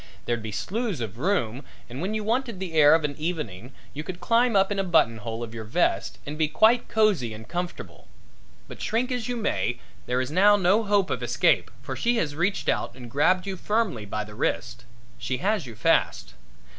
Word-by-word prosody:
There'd 120 -1 -1
be 110 0 -6
slews 210 - -2
of 115 -1 -5
room 140 - 0 0.2
and 125 +4 -7
when 200 +4 -2
you 215 - -2
wanted 230 -1 -1
the 185 -3 -5
air 150 -1 +7
of 165 - 0
an 145 -1 -2
evening 140 - -4 0.2
you 150 - -5
could 175 +2 -7
climb 230 +5 +2
up 195 +1 +3
in 200 - -1
a - - +1
buttonhole 115 - +1
of 115 -1 -7
your 110 -1 -6
vest 115 +12 0
and 150 +2 -6
be 155 - +3
quite 225 +9 +3
cosy 190 - +1
and 110 +1 -11
comfortable. 175 +1 -6 0.6
But - - -10
shrink 245 +3 0
as 245 -3 -2
you 245 - -1
may, 165 - -1 0.3
there 125 +1 +1
is 130 +2 -2
now 200 +5 +6
no 200 +2 +3
hope 200 -2 +2
of - - -2
escape, - - +2
for - - -5
she 240 0 +1
has 150 -8 -1
reached 180 +5 -1
out 120 - 0
and 120 -2 -10
grabbed 180 +8 +2
you 195 -1 -3
firmly 200 - -1
by 110 +1 -3
the 105 0 -11
wrist. 120 +2 -2 0.3
She 130 - -2
has 195 - 0
you 115 - -9
fast. - - +1
170 Hz, 205 wpm, -25 LUFS, -, 0.6 s, air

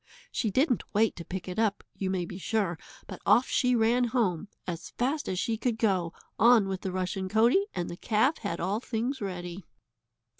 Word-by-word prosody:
She 225 - 0
didn't 255 - +2
wait 220 +1 +3
to 170 - -6
pick 185 +2 -6
it 185 +3 -4
up, 215 -3 +1
you 190 - -3
may 185 -2 -1
be 180 +2 -8
sure, 195 -5 -1 0.3
but - - -9
off 220 +5 +5
she 250 -1 +2
ran 235 +2 +3
home, 215 -7 0 0.2
as 170 -2 -5
fast 275 +5 -1
as 185 - -2
she 225 +4 0
could 230 0 -1
go, 190 -7 +1 0.3
on 230 -3 +6
with 190 -1 -3
the 190 - -3
rushen 185 +1 -2
coatie, 235 - +4
and 175 - -2
the 175 - -7
calf 225 - +2
had 200 -6 -3
all 195 +5 0
things 245 +3 -3
ready. 180 -1 -5
210 Hz, 195 wpm, -29 LUFS, 185-235 Hz, 0.3 s, on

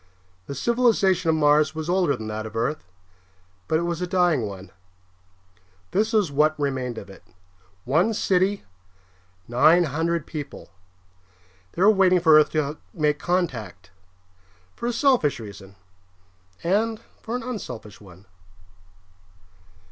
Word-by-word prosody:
The 140 - -6
civilization 200 - +2
of 160 - +3
Mars 150 0 +3
was 160 0 -5
older 175 -5 +2
than 110 - -7
that 110 0 -5
of 110 - -12
Earth, 120 - -2 0.8
but 160 - +2
it 170 - -1
was 170 0 -3
a 180 - -2
dying 175 - +1
one. 95 -1 -10 1.2
This 215 +3 +1
was 210 -9 +1
what 155 +2 +2
remained 130 -4 -2
of - - -8
it: 95 - -14 0.6
one 170 - +2
city, 190 +1 +1 0.8
nine 155 +9 +5
hundred 165 +1 -1
people. 145 -3 -8 1.0
They 180 - 0
were 210 - +7
waiting 190 -3 +4
for 160 -3 +6
Earth 150 - +3
to 155 -1 -1 0.2
make 150 -3 +1
contact, 125 - -3 0.8
for 235 - -4
a - - +1
selfish 240 - +2
reason 100 -3 -11 0.9
and 215 +5 0 0.2
for 230 - -5
an 250 - -4
unselfish 125 - -7
one. 95 0 -16
155 Hz, 135 wpm, -24 LUFS, 130-185 Hz, 1.2 s, were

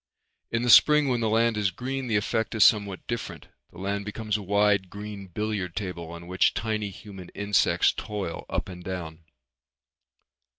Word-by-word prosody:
In 115 +1 -1
the 120 - +4
spring 150 +1 +7
when 125 -2 +1
the 115 -1 0
land 115 0 +2
is 105 -2 +2
green 130 +7 -4
the 110 - 0
effect 110 +2 0
is 110 - +5
somewhat 100 -3 +3
different. 120 -2 -5 0.2
The - - -17
land 100 +2 -2
becomes 105 0 -3
a 105 - -1
wide 100 -1 +2
green 105 -1 -8
billiard 100 -2 -3
table 90 -5 -5
on 85 0 -9
which 90 +2 +2
tiny 110 -2 -2
human 95 -2 -11
insects 100 0 +2
toil 105 -6 -5
up - - -2
and 90 -1 -9
down. 85 -4 -6
105 Hz, 170 wpm, -26 LUFS, 95-110 Hz, 0.2 s, spring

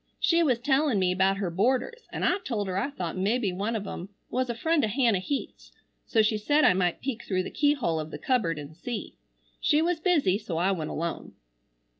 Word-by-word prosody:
She 335 0 +3
was 265 -8 +3
tellin 265 0 +2
me 185 -1 +2
about 190 +1 +2
her 195 -3 -2
boarders 255 - 0
an - - -4
I 370 - +2
told 225 - -3
her 185 - -3
I 200 +9 0
thought 180 - -5
mebbe 200 0 0
one 210 +5 -2
of 210 -2 -3
em 185 -1 -6 0.2
was 255 0 0
a 235 - -2
friend 320 +6 +1
o' - - +3
Hannah 230 -3 +2
Heath's 275 +10 -5 0.4
so 220 -2 +3
she 215 0 +1
said 290 +8 +3
I - - +6
might 180 -2 0
peek 250 -3 -4
through 185 -2 -1
the - - -6
key 290 0 +3
hole 170 - -1
of 155 0 -5
the - - -6
cubberd 210 -12 0
an 145 +1 -8
see. 220 +7 -6 0.5
She 300 - +3
was 335 +1 +1
busy 305 - +2
so 180 -6 -4
I 180 +4 +2
went 160 -5 -2
alone. 170 +1 -4
215 Hz, 225 wpm, -27 LUFS, 185-275 Hz, 0.5 s, I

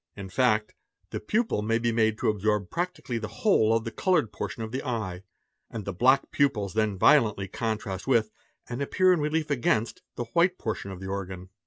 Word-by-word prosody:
In 95 -2 -7
fact, 110 -1 +1 0.4
the - - -3
pupil 215 - 0
may 115 +2 +1
be 115 0 0
made 110 -1 +2
to - - +1
absorb 105 -2 0
practically 175 -9 -3
the 110 - -4
whole 110 - +2
of 115 - 0
the 115 - -5
coloured 155 - +1
portion 105 +2 -4
of: 110 - -6
the 130 +2 -3
eye, 110 -8 -3 0.5
and 110 -4 -6
the 100 - -3
black 130 +8 +3
pupils 110 -9 +1
then 110 -2 0
violently 105 -4 +4
contrast 105 -2 -3
with, 115 -5 +2 0.4
and 125 +2 -5
appear 185 +6 +3
in 175 - +1
_ - - -1
relief 150 0 -1
against, 115 -4 0
the 120 - -3
white 180 +2 +3
portion 110 -3 -4
of 95 -1 -8
the 95 - -6
organ. 95 -1 -5
110 Hz, 200 wpm, -27 LUFS, 105-135 Hz, 0.5 s, violently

